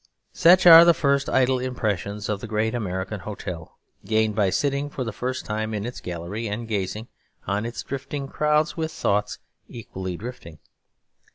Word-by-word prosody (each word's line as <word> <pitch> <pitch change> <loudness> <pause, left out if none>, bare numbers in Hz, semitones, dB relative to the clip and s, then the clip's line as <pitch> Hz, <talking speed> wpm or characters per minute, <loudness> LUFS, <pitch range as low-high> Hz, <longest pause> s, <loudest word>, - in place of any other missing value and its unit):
Such 180 +1 +5
are 165 -1 +11
the 170 -1 +5
first 140 -2 +1
idle 130 0 +2
impressions 105 -5 -3
of 105 -1 -2
the 115 - -6
great 110 +1 -1
American 95 -2 -3
hotel, 90 -4 -7 0.3
gained 110 -1 +1
by 100 -2 +2
sitting 140 +6 -1
for 135 - -4
the 115 -3 -5
first 130 +4 -4
time 110 0 -3
in 105 0 -3
its 125 - -6
gallery 90 +6 -5
and 110 +3 -4
gazing 105 +1 -3 0.4
on 100 +3 -1
its 120 - -6
drifting 140 +1 -5
crowds 150 +2 +1
with 160 -1 -3
thoughts 105 -7 -1 0.3
equally 95 -6 -6
drifting. 100 -8 -9
110 Hz, 165 wpm, -24 LUFS, 100-135 Hz, 0.4 s, are